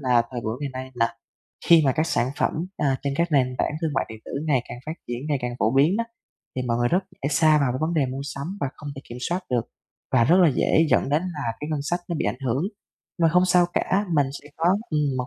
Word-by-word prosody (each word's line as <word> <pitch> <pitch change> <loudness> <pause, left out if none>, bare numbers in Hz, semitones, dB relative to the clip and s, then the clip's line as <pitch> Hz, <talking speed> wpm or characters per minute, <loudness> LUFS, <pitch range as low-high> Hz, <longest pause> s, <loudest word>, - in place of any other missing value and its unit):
là 125 -3 +3
thời 120 -2 -4
buổi 110 +2 -3
ngày 140 - -3
nay 130 - -10
là 115 -1 0 0.5
khi 165 -2 +7
mà 130 - +4
các 155 +4 0
sản 130 -6 +1
phẩm, - - +2 0.2
a, 140 -3 +1
trên 140 -1 -1
các 170 +1 +1
nền 130 -3 +3
tảng - - 0
thương 160 - +1
mại - - +1
điện 110 0 -9
tử - - -9
ngày 135 -6 +2
càng 120 - -7
phát 155 - -2 0.2
triển, 120 0 -3
ngày 145 - +1
càng 120 0 -2
phổ 110 +3 +2
biến 145 +7 +4
á, 230 - +1 0.5
thì 130 - -1
mọi 115 -2 0
người 120 - +2
rất 180 +6 +2
dễ 140 - -4
sa 155 0 +4
vào 135 -4 +1
cái 130 - -3
vấn 160 +2 0
đề 145 -5 +2
mua 130 +1 -5
sắm 145 +8 -5
và 140 - +1
không 150 - -8
thể 135 - -8
kiểm 120 +1 -7
soát 180 +2 -1
được, 120 -2 +1 0.5
và 120 -3 +5
rất 175 +7 +5
là 170 - +7
dễ 160 +3 +3
dẫn - - +3
đến 150 +4 +2
là 150 -11 -3
cái 150 - -4
ngân 150 -2 -1
sách 175 +5 -1
nó 170 - -2
bị - - -1
ảnh 125 - -2
hưởng. 130 +5 +1 0.6
Mà 165 - +6
không 180 +3 +4
sao 180 -1 +4
cả, 200 +2 +1
mình 145 -3 +4 0.2
sẽ 145 - -14
có 165 - -2 0.3
ừm, 150 - +1 0.2
một 125 - -2
140 Hz, 275 wpm, -24 LUFS, 125-160 Hz, 0.6 s, khi